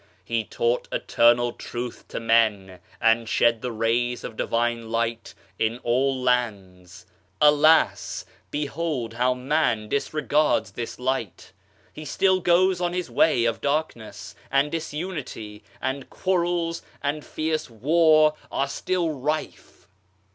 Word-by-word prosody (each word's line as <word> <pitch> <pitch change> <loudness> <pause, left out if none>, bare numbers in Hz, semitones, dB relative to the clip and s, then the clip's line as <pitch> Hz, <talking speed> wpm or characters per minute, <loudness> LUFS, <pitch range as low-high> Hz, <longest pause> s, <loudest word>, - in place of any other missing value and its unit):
He 115 +1 -1
taught 120 +3 -1
Eternal 120 +1 +3
Truth 120 0 -7
to - - -5
men, 110 -5 +1 0.2
and 115 0 +2
shed 115 0 +2
the 125 - -3
rays 115 +2 0
of 110 - -7
Divine 115 0 -1
Light 115 0 -2 0.2
in 110 +1 0
all 130 +2 +1
lands. 95 -8 -2 0.3
Alas! 150 +2 +4 0.2
behold 145 -5 -3
how 125 +2 +1
man 125 -5 0
disregards 150 -4 +1
this 115 +3 -6
Light. 125 -6 -3 0.4
He 155 - -8
still 185 +5 +2
goes 180 +1 +3
on 175 0 0
his 180 -1 -3
way 125 -7 +3
of 115 -1 -1
darkness, 140 -6 -3 0.2
and 140 +2 +2
disunity, 150 - -5 0.2
and 130 +1 -4
quarrels 175 -2 -1 0.2
and 145 +1 -2
fierce 155 -2 -3
war 155 +5 +4 0.2
are 140 - 0
still 175 +3 -1
rife. 150 +2 -4
130 Hz, 120 wpm, -24 LUFS, 115-155 Hz, 0.4 s, Alas